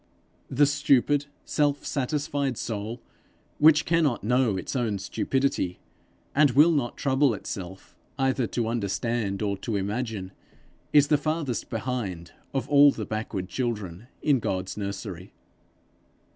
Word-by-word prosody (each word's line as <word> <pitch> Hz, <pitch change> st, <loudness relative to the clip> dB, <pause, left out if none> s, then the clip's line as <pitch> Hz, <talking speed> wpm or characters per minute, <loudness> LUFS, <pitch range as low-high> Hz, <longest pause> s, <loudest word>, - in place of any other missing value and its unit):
The 140 Hz, +2 st, +4 dB
stupid, 145 Hz, 0 st, +2 dB, 0.2 s
self 145 Hz, -1 st, 0 dB
satisfied 140 Hz, -2 st, -1 dB
soul, 110 Hz, +2 st, -4 dB, 0.6 s
which 150 Hz, 0 st, +6 dB
cannot 160 Hz, -, +1 dB
know 120 Hz, -2 st, +2 dB
its 95 Hz, -, -5 dB
own 115 Hz, -5 st, 0 dB
stupidity, 130 Hz, -3 st, -1 dB, 0.6 s
and 145 Hz, 0 st, +5 dB
will 150 Hz, +6 st, +6 dB
not 140 Hz, -7 st, -1 dB
trouble 135 Hz, -3 st, +2 dB
itself 95 Hz, -2 st, -8 dB, 0.2 s
either 135 Hz, -3 st, +1 dB
to 115 Hz, 0 st, -2 dB
understand 110 Hz, -1 st, -1 dB
or 100 Hz, -1 st, 0 dB
to 110 Hz, +2 st, -3 dB
imagine, 100 Hz, -1 st, -3 dB, 0.6 s
is 145 Hz, -1 st, +5 dB
the 150 Hz, -, +4 dB
farthest 155 Hz, -6 st, -2 dB
behind 105 Hz, -8 st, -4 dB, 0.2 s
of 135 Hz, 0 st, -2 dB
all 145 Hz, 0 st, +7 dB
the 110 Hz, -, -5 dB
backward 110 Hz, -3 st, -4 dB
children 105 Hz, -3 st, -4 dB, 0.2 s
in 145 Hz, -4 st, +3 dB
God's 95 Hz, -4 st, -3 dB
nursery. 100 Hz, -2 st, -6 dB
120 Hz, 125 wpm, -26 LUFS, 100-140 Hz, 0.6 s, all